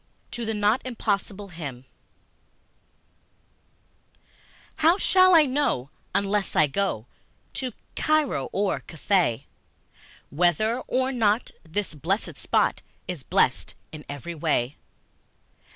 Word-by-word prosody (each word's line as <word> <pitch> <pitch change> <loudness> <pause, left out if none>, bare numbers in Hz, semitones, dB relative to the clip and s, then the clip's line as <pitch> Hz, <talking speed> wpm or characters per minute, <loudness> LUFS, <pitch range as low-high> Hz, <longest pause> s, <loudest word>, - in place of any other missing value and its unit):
To 240 -1 -4
the 220 0 -1
Not 210 +4 +2
Impossible 205 -4 -2
Him 140 -7 -7 2.9
HOW 330 +4 +5
shall 370 -2 +5
I 315 -2 +7
know, 255 - 0 0.2
unless 200 0 0
I 155 - +6
go 150 - -1 0.5
To 255 -2 -3 0.2
Cairo 305 - +1
or 200 0 0
Cathay, 165 - 0 0.9
Whether 180 - +2
or 260 +1 +1
not 225 -2 +1
this 180 +3 -3
blessèd 170 +8 -2
spot - - +1 0.3
Is 180 -6 -4
blest 120 - +1 0.2
in 155 -1 -9
every 145 +4 -6
way? 150 -5 0
200 Hz, 105 wpm, -25 LUFS, 155-240 Hz, 2.9 s, I